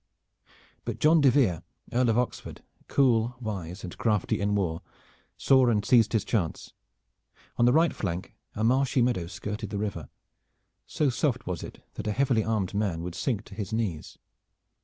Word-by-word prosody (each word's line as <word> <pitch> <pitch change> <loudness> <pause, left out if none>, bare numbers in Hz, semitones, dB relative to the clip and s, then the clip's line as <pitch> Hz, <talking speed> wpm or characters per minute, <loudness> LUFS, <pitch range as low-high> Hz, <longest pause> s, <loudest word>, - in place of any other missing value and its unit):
But - - -4
John 155 +1 +4
de 140 - +6
Vere, 115 - +2 0.3
Earl 125 0 +3
of 115 - +2
Oxford, 125 0 -3 0.2
cool, 120 -3 +2
wise 95 -5 -5
and 90 - -7
crafty 105 -5 0
in 105 0 +1
war, 85 -5 -1 0.6
saw 130 -2 +4
and 105 -3 +1
seized 115 -4 +4
his 110 - +1
chance. 90 -9 -2 0.8
On 120 - +4
the 120 - +5
right 160 +5 +3
flank 90 -2 -4 0.2
a 110 - -2
marshy 130 +1 +3
meadow 120 -9 0
skirted 105 +4 -5
the 105 - -4
river. 100 -6 -4 0.8
So 145 -3 +1
soft 125 0 -1
was 90 -2 -4
it - - -10
that - - -6
a 105 - 0
heavily 125 -2 +2
armed 110 -5 -1
man 100 -5 -1
would 90 0 -5
sink 110 +4 -2
to - - -13
his 105 -1 -5
knees. 105 -9 -3
110 Hz, 170 wpm, -27 LUFS, 95-125 Hz, 0.8 s, de